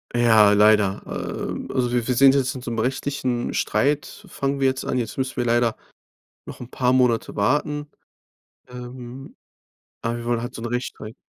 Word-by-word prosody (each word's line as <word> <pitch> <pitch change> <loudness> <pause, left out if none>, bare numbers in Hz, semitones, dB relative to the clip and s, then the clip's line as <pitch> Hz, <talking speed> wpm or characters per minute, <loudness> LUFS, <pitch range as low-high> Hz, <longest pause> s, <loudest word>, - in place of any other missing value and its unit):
Ja, 110 -3 +5
leider. 105 -1 +4
Ähm, - - -5
also 125 -2 0
wir 120 -2 0
wir 125 - +1
sind 135 +2 +7
jetzt 130 -1 0
in 130 - -7
so 120 - -5
'nem 115 - -2
richtigen 130 0 -2
Streit 145 0 +1 0.2
f - - -18
fangen 140 0 -2
wir 135 - +1
jetzt 130 0 -1
an. 130 - -2
Jetzt 120 -3 -3
müssen 130 0 -2
wir 120 - 0
leider 120 -1 +2 0.7
noch - - -9
'n 125 - -8
paar 125 -1 +1
Monate 125 -3 +2
warten, 145 +7 0 0.8
ähm, 125 +1 -9 0.7
aber 115 0 -2
wir 120 - -7
wollen 120 -1 0
halt 120 +1 -6
so 115 - -7
'n - - -3
Rechtsstreit 120 -2 -5
125 Hz, 185 wpm, -23 LUFS, 115-130 Hz, 0.8 s, sind